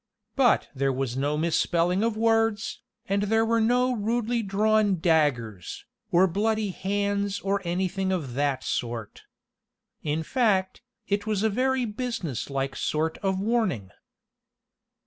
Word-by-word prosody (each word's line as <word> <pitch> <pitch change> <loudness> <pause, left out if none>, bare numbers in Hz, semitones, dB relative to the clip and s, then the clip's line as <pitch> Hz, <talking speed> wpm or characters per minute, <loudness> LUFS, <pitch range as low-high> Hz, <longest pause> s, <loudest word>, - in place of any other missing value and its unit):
But 255 -4 +3
there 135 0 0
was 130 -2 -2
no 145 +3 0
misspelling 170 +3 +1
of 225 -1 0
words, 225 -1 +1 0.3
and 200 +1 +1
there 225 +2 +2
were 230 0 +2
no 250 +3 +3
rudely 230 +2 0
drawn 210 -1 +2
daggers, 130 - 0 0.3
or 175 +2 +5
bloody 210 +3 0
hands 200 +1 -1
or 200 +1 -1
anything 190 +2 -1
of 155 -10 -2
that 140 0 0
sort. 115 -3 -4 0.8
In 155 +1 -1
fact, 195 - +1 0.3
it 205 +1 -1
was 210 -2 0
a 220 - +3
very 255 +3 +1
business 210 - -4
like 135 0 -2
sort 160 +1 -1
of 190 -1 -1
warning. 200 - 0
195 Hz, 130 wpm, -26 LUFS, 155-220 Hz, 0.8 s, or